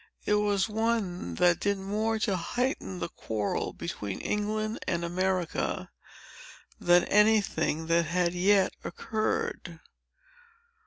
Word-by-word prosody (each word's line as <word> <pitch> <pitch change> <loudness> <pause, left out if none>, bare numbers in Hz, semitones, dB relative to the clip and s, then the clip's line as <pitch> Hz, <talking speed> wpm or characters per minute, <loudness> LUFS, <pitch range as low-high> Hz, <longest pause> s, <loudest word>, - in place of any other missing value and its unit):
It - - +2
was 205 -2 +2
one 215 - -1
that 175 - +4
did 200 0 0
more 210 +3 -1
to 210 -2 0
heighten 180 - -2
the 85 -1 -3
quarrel 105 -2 -2
between 100 -2 -5
England 215 +1 -2
and 170 -1 0
America, 185 0 -1 0.9
than 175 0 +5
any 215 +1 +5
thing 160 -4 -2
that 165 +1 +2
had 175 +1 +1
yet 190 +2 +3
occurred. 335 - -3
190 Hz, 115 wpm, -29 LUFS, 170-215 Hz, 0.9 s, than